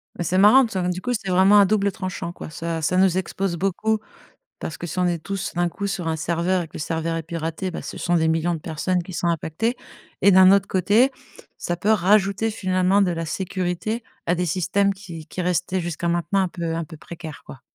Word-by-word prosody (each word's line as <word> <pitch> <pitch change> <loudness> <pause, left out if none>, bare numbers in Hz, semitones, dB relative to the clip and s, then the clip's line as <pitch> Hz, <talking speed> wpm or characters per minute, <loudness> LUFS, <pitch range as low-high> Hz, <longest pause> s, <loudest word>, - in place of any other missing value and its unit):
Bah 175 - -3
c'est 185 +3 0
marrant, 215 +7 +7
t 225 - -7
ça 185 -1 -1
donc 180 - 0
du 185 - -6
coup, 245 - -2
c'est 195 -4 -3
vraiment 190 +3 +6
à 200 - +7
double 200 0 +1
tranchant, 185 -2 -5
quoi, 155 - -9
ça 165 -1 -4
ça 180 +4 +1
nous 185 -1 +4
expose 190 -1 -2
beaucoup 195 +4 0 0.6
parce 155 - -5
que 175 - -5
si 185 - -5
on 180 - +2
est 175 -1 0
tous, 195 +3 -4
d'un 175 0 +1
coup, 200 +4 -4
sur 190 -4 -3
un 160 - 0
serveur 170 +3 0
et - - -7
que - - -31
le - - -5
serveur 165 +1 -2
est 165 - -3
piraté, 165 +2 -4
bah, - - -5
ce - - -7
sont 175 - 0
des 160 -1 +3
millions 165 +2 +1
de 160 - -5
personnes 175 +3 -1
qui 185 - -10
sont 175 - -1
impactées 170 - -1 0.5
et 200 - +7
d'un 185 0 +7
autre 200 0 +3
côté 210 +8 +3 0.5
ça 175 - -2
peut 205 +5 0
rajouter, 205 +1 +3
finalement, 185 0 +2
de 180 - +2
la 165 -1 -3
sécurité 190 +6 -3 0.2
à 175 - +2
des 180 0 -1
systèmes 190 +4 +1
qui 170 -5 -10
qui 180 +4 -5
restaient 180 +1 0
jusqu'à 170 0 -4
maintenant 175 +3 +1
un 185 - 0
peu 170 -2 -4
un 165 - -2
peu 160 0 -11
précaire, 160 -1 -9
quoi? 130 - -11
180 Hz, 240 wpm, -23 LUFS, 170-195 Hz, 0.6 s, marrant